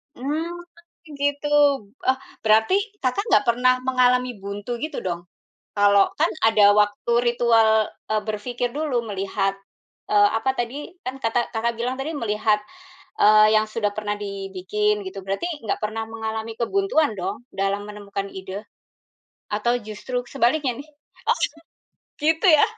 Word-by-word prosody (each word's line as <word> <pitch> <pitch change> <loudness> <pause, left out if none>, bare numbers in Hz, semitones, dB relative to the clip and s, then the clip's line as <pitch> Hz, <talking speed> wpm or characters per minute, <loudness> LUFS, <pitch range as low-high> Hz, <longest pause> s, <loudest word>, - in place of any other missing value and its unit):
Mmm, 295 +6 -2 0.7
gitu, 285 +1 0 0.6
eh, 260 0 +4 0.3
berarti, 220 - +4 0.3
Kakak, 260 +11 +1
nggak 275 - +4
pernah 250 +2 +4
mengalami 250 -2 +2
buntu 205 +4 -5
gitu, 310 +1 -4
dong? 175 -1 -4 0.5
Kalau 200 -1 +4
kan 325 - +4 0.2
ada 210 -2 +6
waktu 210 +2 +1
ritual, 225 -2 +4 0.2
eee, 215 -1 +2
berpikir 245 +3 -2
dulu 275 -6 -1
melihat, 195 0 -1 0.6
eee, 205 -1 +6
apa 265 +4 +1
tadi, 265 +7 -4
kan 255 +1 -3
kata 225 +1 +2
Kakak, 230 +1 0
bilang 250 +2 -1
tadi, 295 +4 -3
melihat, 210 -2 +1 0.6
eee, 215 +1 +6
yang 215 0 +4
sudah 210 -2 -1
pernah 210 -1 -2
dibikin, 200 +1 -2
gitu. 195 0 -7
Berarti 195 - -2 0.2
nggak 210 - -2
pernah 220 +1 -2
mengalami 225 0 -4
kebuntuan, 315 - +1
dong 195 +6 -5
dalam 195 +1 -1
menemukan 200 -1 -5
ide? 190 +2 -7 0.9
Atau 240 +4 +1
justru 230 +4 -4
sebaliknya 260 0 +1
nih? 310 - -21 0.4
Oh! - - +4 0.8
Gitu, 320 +5 +2
ya? 310 -4 +7
220 Hz, 135 wpm, -23 LUFS, 205-250 Hz, 0.9 s, ya